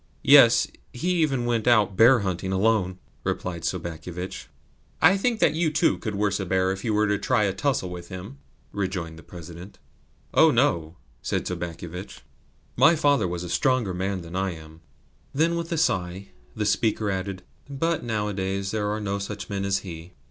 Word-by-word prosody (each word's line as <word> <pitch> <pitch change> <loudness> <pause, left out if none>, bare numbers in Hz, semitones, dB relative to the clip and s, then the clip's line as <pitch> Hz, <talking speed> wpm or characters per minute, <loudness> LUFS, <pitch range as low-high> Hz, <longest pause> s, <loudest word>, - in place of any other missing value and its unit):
"Yes, - - +7 0.3
he 170 +9 -2
even 135 -6 +1
went 120 -1 0
out 105 -5 +4
bear 120 +3 +6
hunting 95 -1 -2
alone," 95 -2 +1 0.3
replied 85 -3 -3
Sobakevitch. 85 +2 -5 0.5
"I 160 - +7
should 195 0 0
think 240 -1 +1
that 150 - +4
you 160 0 +1
too 155 +2 +2
could 110 -3 -4
worst 100 0 0
a 95 - -2
bear 95 0 +1
if 95 0 -5
you 115 - 0
were 105 0 +2
to 105 -1 0
try 125 -4 +1
a 100 -2 +1
tussle 95 -3 -1
with 85 -1 -8
him," 95 +9 -8 0.3
rejoined 90 -5 -4
the - - -12
President. 85 +3 -11 0.6
"Oh - - +6
no," 80 0 +1 0.2
said - - -2
Sobakevitch. 85 +2 -6 0.5
"My 170 - +6
father 145 - +2
was 90 0 -4
a - - -5
stronger 115 +2 +1
man 95 +1 -2
than 85 +1 -9
I 95 -1 -1
am." 80 0 -13 0.5
Then 165 +4 +2
with 170 0 -4
a 165 - 0
sigh 95 - -1 0.3
the 105 - -1
speaker 105 -1 +1
added: 95 -1 -4 0.3
"But 165 +4 -1
nowadays 100 -3 -2
there 105 -1 -1
are 105 +1 -2
no 100 -1 -2
such 100 +1 -6
men 100 -1 -2
as 100 0 -1
he. 85 0 -9
100 Hz, 180 wpm, -25 LUFS, 90-115 Hz, 0.6 s, Yes